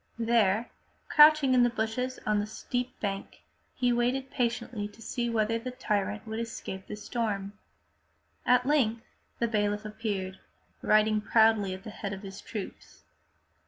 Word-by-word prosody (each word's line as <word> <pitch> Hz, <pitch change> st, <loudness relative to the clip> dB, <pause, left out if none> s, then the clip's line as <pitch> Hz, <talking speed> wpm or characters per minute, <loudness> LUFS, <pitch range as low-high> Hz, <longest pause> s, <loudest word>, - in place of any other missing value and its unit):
There, 230 Hz, -1 st, +2 dB, 0.4 s
crouching 300 Hz, -3 st, +7 dB
in 250 Hz, -, +5 dB
the 245 Hz, -, +5 dB
bushes 240 Hz, +3 st, -2 dB
on 210 Hz, -1 st, +2 dB
the 205 Hz, -, -2 dB
steep 250 Hz, +3 st, -4 dB
bank, 195 Hz, -1 st, -4 dB, 0.3 s
he 245 Hz, -1 st, +2 dB
waited 255 Hz, +3 st, 0 dB
patiently 235 Hz, -3 st, -2 dB
to 210 Hz, -, -18 dB
see 235 Hz, +1 st, -2 dB
whether 225 Hz, 0 st, +1 dB
the 255 Hz, +2 st, -5 dB
tyrant 210 Hz, -4 st, -2 dB
would 220 Hz, 0 st, -4 dB
escape 225 Hz, -4 st, -6 dB
the 210 Hz, -, -5 dB
storm. 210 Hz, -3 st, -3 dB, 0.9 s
At 250 Hz, 0 st, +4 dB
length 240 Hz, -6 st, +2 dB, 0.3 s
the 235 Hz, -, +1 dB
bailiff 205 Hz, -1 st, 0 dB
appeared, 205 Hz, -3 st, -4 dB, 0.4 s
riding 215 Hz, 0 st, +3 dB
proudly 220 Hz, -3 st, +3 dB
at 190 Hz, -, -12 dB
the 215 Hz, -, -7 dB
head 205 Hz, -1 st, -5 dB
of 195 Hz, +1 st, -8 dB
his 195 Hz, 0 st, -8 dB
troops. 210 Hz, -4 st, -8 dB
220 Hz, 150 wpm, -29 LUFS, 205-240 Hz, 0.9 s, crouching